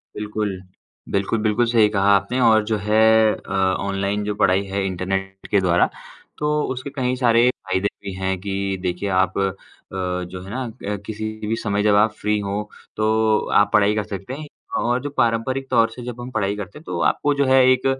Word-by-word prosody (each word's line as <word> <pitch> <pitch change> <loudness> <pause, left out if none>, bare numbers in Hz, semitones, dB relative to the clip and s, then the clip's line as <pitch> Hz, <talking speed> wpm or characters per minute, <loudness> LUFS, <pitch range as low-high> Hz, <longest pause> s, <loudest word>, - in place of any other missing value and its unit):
बिल्कुल। 105 -2 -3 0.5
बिल्कुल, 100 +3 0
बिल्कुल 110 +2 +2
सही 110 -3 +5
कहा 100 -1 +2
आपने, 100 +6 0
और 110 -3 +5
जो 110 0 0
है 105 +2 +2 0.3
अ, - - -12 0.3
ऑनलाइन 100 +1 -1
जो 105 0 -2
पढ़ाई 95 0 +3
है, 95 0 -2
इंटरनेट 95 +1 -3
के 100 - +4
द्वारा, 90 -1 +3 0.5
तो 150 0 0
उसके 130 +2 -6
कई 125 -1 0
सारे 120 -1 +4
फ़ायदे 95 -4 -2 0.2
भी 100 -1 -5
हैं। 95 0 -2
कि 100 -1 -2
देखिए 90 +2 -2
आप 95 0 +1
अ, 95 -1 +1 0.4
जो 90 -1 -3
है 95 - -10
ना, 130 +4 -3
अ, 110 -3 -5
किसी 110 0 -5 0.2
भी 110 - 0
समय 105 -1 0
जब 105 -1 +4
आप 105 0 +4
फ्री 105 0 +1
हों, 100 +1 -2 0.3
तो 110 0 +2 0.2
आप 105 0 +2
पढ़ाई 105 0 +4
कर 105 - 0
सकते 100 +4 -7
हैं। 150 +2 -7 0.3
और 120 +2 +1
जो 145 - -4
पारंपरिक 120 +3 0
तौर 115 -2 +4
से 125 - -9
जब 125 0 -7
हम 125 +1 -7
पढ़ाई 100 -3 -1
करते 105 +4 -7
हैं, - - -18
तो 90 - -4
आपको 145 - 0
जो 140 -1 +1
है 130 0 +5
एक 130 0 +1
105 Hz, 200 wpm, -21 LUFS, 95-115 Hz, 0.5 s, सही